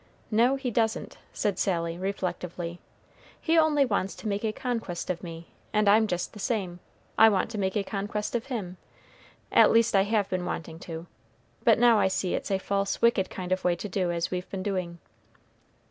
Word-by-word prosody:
No, 235 +5 +4
he 265 -2 -3
doesn't," 225 +1 -1
said 200 -3 -1
Sally, 170 -3 0
reflectively. 180 -2 -4 0.6
"He 330 - +1
only 310 -3 +4
wants 200 -5 -1
to - - -7
make 205 +1 -1
a 220 - +1
conquest 225 -8 -3
of 170 - -5
me, 165 -1 -9 0.2
and 210 -1 +2
I'm 215 +2 +5
just 175 -3 -3
the 210 - -10
same. 195 -6 -2 0.4
I 225 - +9
want 200 +1 0
to 215 - -4
make 190 +1 0
a 205 - +1
conquest 205 +1 -3
of 240 0 -2
him, 200 -9 -4 0.7
at - - +7
least 230 -1 +3
I 195 - +6
have 205 0 +1
been 185 -1 -2
wanting 165 -2 -5
to, 165 0 -5 0.6
but 225 - +5
now 235 -2 +5
I - - +4
see 190 -1 -1
it's - - -3
a 195 - +2
false, 200 +1 -1
wicked 235 -5 +3
kind 185 -1 -6
of 185 - 0
way 180 -1 +2
to 175 - -6
do 180 -2 -1
as 170 0 -2
we've 180 0 -4
been 190 -1 -4
doing." 185 -4 -2
195 Hz, 195 wpm, -27 LUFS, 180-220 Hz, 0.7 s, I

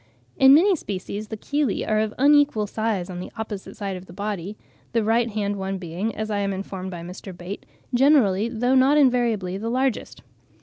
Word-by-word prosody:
In 270 +1 +7
many 375 +5 +5
species 205 - -5
the 220 - -6
chelae 285 -1 -1
are 215 0 +2
of 215 0 0
unequal 285 -5 +4
size 210 -3 -2
on 180 -1 -6
the 180 - -7
opposite 215 -1 -6
side 200 -3 -3
of 185 +1 -10
the 170 - -12
body, 205 0 -4 0.4
the 230 -1 +2
right 230 +2 +2
hand 205 -1 -2
one 195 0 -3
being, 185 +5 -4
as 215 0 -3
I 205 - 0
am 200 -1 -1
informed 190 -1 -5
by 175 -2 -7
Mr. 180 +1 -9
Bate, 180 +3 -8 0.3
generally, 240 -6 +4
though 245 +2 0
not 265 +3 +5
invariably, 235 -9 +2
the 225 +2 -3
largest. 255 0 -1
215 Hz, 190 wpm, -23 LUFS, 190-245 Hz, 0.4 s, In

